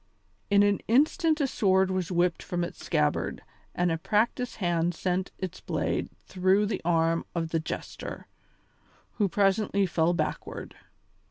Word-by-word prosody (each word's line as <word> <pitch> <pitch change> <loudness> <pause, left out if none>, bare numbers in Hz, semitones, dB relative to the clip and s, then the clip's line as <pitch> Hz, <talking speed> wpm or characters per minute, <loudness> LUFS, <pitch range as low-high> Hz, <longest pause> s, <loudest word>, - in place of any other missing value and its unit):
In 200 0 +5
an 205 -1 +3
instant 310 - +3
a - - +3
sword 190 -7 +2
was 185 -2 -2
whipped 175 -1 +1
from 175 -1 -2
its 170 - -7
scabbard 150 -2 0 0.3
and 175 -1 +1
a 165 - -1
practised 225 +6 0
hand 175 -2 0
sent 185 +2 -1
its 185 -2 -6
blade - - -1 0.2
through 190 +2 +2
the 205 - -2
arm 165 0 +2
of 165 -1 -1
the 165 - 0
jester, 160 - -6 0.9
who 205 -2 +3
presently 200 +1 +2
fell 170 -1 +1
backward. 170 - -4
185 Hz, 145 wpm, -28 LUFS, 170-205 Hz, 0.9 s, In